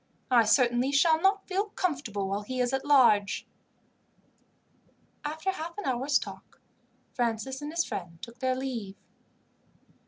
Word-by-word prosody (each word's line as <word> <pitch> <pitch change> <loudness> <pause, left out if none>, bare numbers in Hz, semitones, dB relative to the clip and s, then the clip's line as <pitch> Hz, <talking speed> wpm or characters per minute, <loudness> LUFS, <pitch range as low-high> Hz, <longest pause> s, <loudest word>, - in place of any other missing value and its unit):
"I 235 -3 +6
certainly 245 +3 +3
shall 315 +3 +4
not 390 +1 +2
feel 390 +2 0
comfortable 260 - -2
while 200 +2 -2
he 255 +5 -5
is 250 +1 +1
at 265 - 0
large." 235 -9 +4 1.8
After 315 +6 -2
half 340 -1 -7
an 415 - -5
hour's 265 +2 +2
talk - - -9 0.5
Francis 245 +3 -2
and 295 +1 -5
his 335 +1 0
friend 170 -2 -6
took 235 +5 -11
their 260 0 0
leave. 240 -7 -4
260 Hz, 135 wpm, -28 LUFS, 230-310 Hz, 1.8 s, I